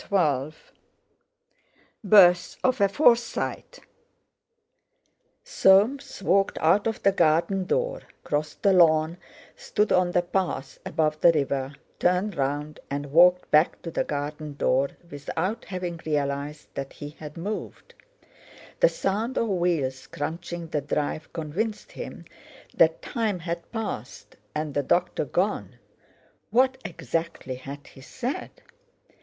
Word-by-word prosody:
CHAPTER 150 -8 +2
XII - - -24 1.5
BIRTH 180 -4 +6
OF 255 -3 +2
A 200 - +5
FORSYTE 240 - +1 1.6
Soames 220 +6 +3
walked 195 +2 +2
out 190 +7 +3
of 225 - -3
the 195 - +5
garden 170 +3 +2
door, - - -1 0.2
crossed 150 +1 -3
the 200 - +5
lawn, 160 -1 +4 0.4
stood 210 - -1
on 180 -1 +3
the 175 0 +1
path 175 -7 -2
above 155 -1 0
the 170 - +7
river, 140 -2 -1 0.2
turned 180 +2 +1
round 145 +2 -2
and 140 0 -4
walked 180 +3 +5
back 155 +3 +4
to 165 - -5
the - - 0
garden 150 0 -4
door, 135 0 +2 0.2
without 165 +9 -3
having 180 -3 -5
realised 145 -1 -3
that 135 0 -5
he 145 0 -8
had 150 0 -10
moved. 205 +6 -6 0.9
The - - +6
sound 220 +6 -2
of 230 - +1
wheels 165 -8 0
crunching 165 +2 -5
the 150 - -1
drive 150 +2 -3
convinced 200 +7 -4
him - - -8 0.5
that - - +3
time 225 -6 -1
had 170 0 -5
passed, 125 - -6 0.2
and 155 -1 -2
the 145 - +1
doctor 175 +3 0
gone. 185 +9 -1 0.7
What, 260 +2 +3
exactly, 165 -2 -3
had 135 +2 -9
he 135 - -15
said? 250 - -4
170 Hz, 125 wpm, -26 LUFS, 145-195 Hz, 1.6 s, the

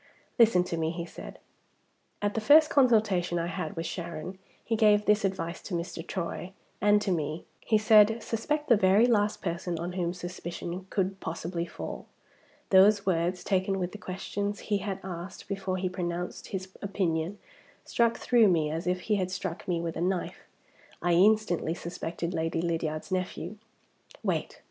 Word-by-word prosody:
"Listen 220 -6 +6
to 175 -2 -4
me," 160 -1 0
he 170 0 -4
said. - - -10 0.9
"At 205 0 +1
the 225 - -1
first 300 +7 +6
consultation 215 -10 +3
I 170 - 0
had 175 -2 -4
with 165 - -3
Sharon 175 +2 -5 0.3
he 230 - 0
gave 210 -1 +4
this 210 0 +3
advice 185 -3 -2
to 185 - -5
Mr. 170 0 -4
Troy 180 +1 -4 0.3
and 210 -1 +5
to 195 - 0
me. 155 -1 -2
He 220 - +2
said, 215 +1 +5
'Suspect 295 +7 -2
the 240 - +6
very 200 +3 +5
last 210 -4 +1
person 170 -1 -2
on 170 +2 -4
whom 175 -1 -1
suspicion 175 +1 -6
could 195 0 -1
possibly 170 +1 -4
fall.' - - -7 0.6
Those 200 +1 +6
words, 180 0 0
taken 195 0 +1
with 180 -1 -2
the 210 - -9
questions 200 +2 -4
he 205 -1 0
had 195 -1 -3
asked 180 0 -7
before 195 -2 -2
he 185 0 -1
pronounced 180 -1 -4
his 190 -1 -5
opinion, 185 -2 -1 0.5
struck 235 -1 +2
through 235 -3 +4
me 160 -5 +2
as 165 +3 -3
if 180 0 0
he 210 +2 +1
had 185 -2 -1
struck 185 -2 -5
me 175 -2 0
with 165 -1 -3
a - - -3
knife. 185 0 -2 0.6
I 175 - +2
instantly 185 -3 +3
suspected 170 0 -4
Lady 165 0 -1
Lydiard's 160 0 -2
nephew. 185 +1 -3 0.7
Wait! - - -2
185 Hz, 170 wpm, -28 LUFS, 170-205 Hz, 0.9 s, Listen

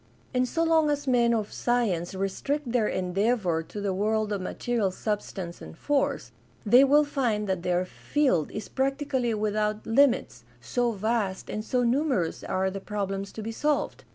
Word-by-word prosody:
And 250 0 +2
so 330 +6 0
long 320 -2 +3
as 290 0 -1
men 240 -3 +3
of 220 -3 -1
science 200 -8 0
restrict 240 +8 -2
their 230 -3 +2
endeavor 185 -1 0
to 185 +5 -8
the 200 -1 -1
world 215 +2 0
of 200 - -2
material 220 +2 -1
substance 190 -3 -4
and - - -10
force, 275 - 0 0.3
they 245 +5 +7
will 290 +2 +5
find 235 -8 -1
that 190 -2 -1
their 180 +1 0
field 220 - 0
is 210 - -6
practically 270 -3 -1
without 210 0 -1
limits, 225 - +2 0.2
so 240 - 0
vast 210 -2 -1
and 215 - -3
so 250 +2 0
numerous 245 - 0
are 190 0 0
the 195 0 -6
prob 200 -1 -3
lems 195 0 -4
to 220 - -6
be 225 - -4
solved. 295 +5 -1
215 Hz, 170 wpm, -27 LUFS, 195-255 Hz, 0.3 s, they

